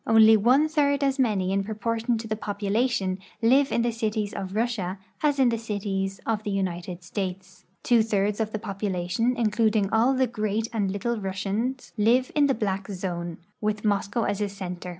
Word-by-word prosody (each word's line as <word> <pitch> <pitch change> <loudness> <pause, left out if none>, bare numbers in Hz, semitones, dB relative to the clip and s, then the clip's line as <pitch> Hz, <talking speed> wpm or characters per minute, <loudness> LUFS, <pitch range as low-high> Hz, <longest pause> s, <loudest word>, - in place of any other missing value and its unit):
Only 220 0 +7
one 250 +8 +4
third 285 -2 +1
as 275 0 +1
many 200 -7 +1
in 195 0 +1
proportion 225 +3 -1
to 220 -1 -3
population 205 -1 -1 0.2
live 270 +4 +4
in 235 - +1
the 240 - +1
cities 215 -2 -2
of 190 +1 -5
Russia 215 -5 -1 0.2
as 295 -2 +2
in 260 -3 +4
the 230 -1 -1
cities 195 -3 -3
of 220 -2 0
the 210 - -4
United 180 -2 -3
States. 190 0 -5 0.2
Two 240 -2 +4
thirds 205 -1 0
of 220 -1 -1
the 215 - -2
population, 200 +2 -1
including 215 -2 +2
all 240 +4 +3
the 260 0 +3
Great 215 -2 -2
and 205 -4 0
Little 225 +4 -2
Russians, 205 +7 -3
live 240 +5 +3
in 290 -1 +4
the 270 - +2
black 195 -3 -2
zone, 175 -3 -4 0.2
with 210 0 -1
Moscow 205 +2 +1
as 205 0 -1
a 205 - 0
center. 180 -2 -6
215 Hz, 180 wpm, -26 LUFS, 195-235 Hz, 0.2 s, Only